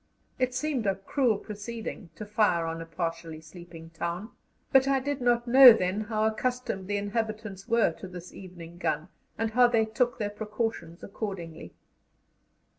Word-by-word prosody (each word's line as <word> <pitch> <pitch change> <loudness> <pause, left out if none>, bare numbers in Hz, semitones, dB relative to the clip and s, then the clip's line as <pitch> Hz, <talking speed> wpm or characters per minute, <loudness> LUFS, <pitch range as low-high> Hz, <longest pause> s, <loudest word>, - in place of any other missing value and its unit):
It 255 -1 0
seemed 260 -5 -1
a 195 - +2
cruel 220 +3 0
proceeding, 210 -2 -7
to 215 - -7
fire 205 -5 +2
on 165 0 -4
a 165 - -8
partially 165 -1 -4
sleeping 165 0 -12
town, 170 +6 -4 0.4
but 265 -1 +5
I 275 -1 +3
did 280 0 -3
not 240 -1 +2
know 255 0 +10
then 185 0 -1
how 215 0 -1
accustomed 220 -3 -1
the 205 0 -1
inhabitants 215 -1 -4
were 230 -6 +3
to 190 - -7
this 180 -1 -10
evening 175 -2 -11
gun, 160 +1 -1 0.3
and 225 0 -1
how 245 +2 +6
they 230 -2 +2
took 240 +3 0
their 205 -1 -2
precautions 210 -5 -4
accordingly. 190 -6 -6
210 Hz, 160 wpm, -28 LUFS, 175-235 Hz, 0.4 s, know